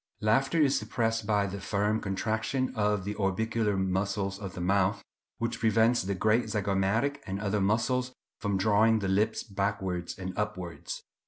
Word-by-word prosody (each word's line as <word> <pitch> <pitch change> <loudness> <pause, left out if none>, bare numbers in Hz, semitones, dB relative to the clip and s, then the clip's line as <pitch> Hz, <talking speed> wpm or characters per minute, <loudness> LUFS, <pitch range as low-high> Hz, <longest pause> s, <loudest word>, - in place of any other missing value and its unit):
Laughter 135 +9 +2
is 145 -3 +4
suppressed 115 0 -1
by 105 -2 +2
the 100 0 -5
firm 105 +2 0
contraction 110 +6 -1
of 105 -2 +1
the 100 +2 -3
orbicular 105 +1 0
muscles 95 +1 -1
of 95 -3 -7
the - - -5
mouth, 100 +3 +1 0.3
which - - -2
prevents 115 +2 +3
the 100 +1 -2
great 110 +5 +2
zygomatic 105 +6 +1
and 95 +1 -3
other 105 0 0
muscles 125 +5 +1 0.3
from 100 -2 0
drawing 110 +3 +4
the 100 -3 -2
lips 105 +4 +1
backwards 95 -4 -2
and 95 -1 -5
upwards. 95 -5 -4
105 Hz, 155 wpm, -29 LUFS, 95-110 Hz, 0.3 s, is